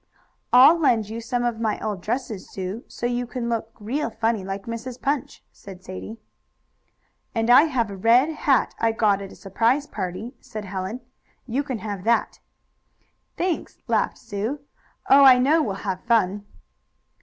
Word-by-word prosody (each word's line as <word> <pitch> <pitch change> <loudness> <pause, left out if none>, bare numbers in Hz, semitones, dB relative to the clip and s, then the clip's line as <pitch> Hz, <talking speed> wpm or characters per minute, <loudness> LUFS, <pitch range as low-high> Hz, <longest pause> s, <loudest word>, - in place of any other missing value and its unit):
"I'll 270 +7 +7
lend 230 -9 +2
you 225 +1 -5
some 240 +1 -2
of 240 -2 -1
my 220 -2 -1
old 205 -4 -4
dresses, 225 -2 -4
Sue, 190 +4 -5
so - - -6
you 245 0 -1
can 235 -1 -4
look 225 -1 -2
real 240 +7 -2
funny, 225 -2 -1
like 195 +1 -5
Mrs. 230 +3 -6
Punch," 280 0 -2
said 190 -2 -13
Sadie. 190 +4 -8 1.2
"And 225 +1 +2
I 270 +5 +8
have 240 -9 -1
a - - -6
red 235 +9 +4
hat 295 -4 +1
I 230 0 +2
got 205 -3 +2
at 195 - -8
a - - -12
surprise 230 +8 0
party," 205 +1 -5
said 215 -1 -7
Helen. 195 +5 -5 0.4
"You 255 +3 -1
can 270 -4 -4
have 205 -3 -6
that." 235 +1 +1 1.0
"Thanks," 355 -2 -2
laughed - - 0
Sue. 225 +6 -4 0.5
"Oh, 280 +1 +7
I 260 -2 +9
know 290 +6 +3
we'll 205 -9 -2
have 185 -2 -3
fun." 205 -3 +1
230 Hz, 165 wpm, -23 LUFS, 205-255 Hz, 1.2 s, I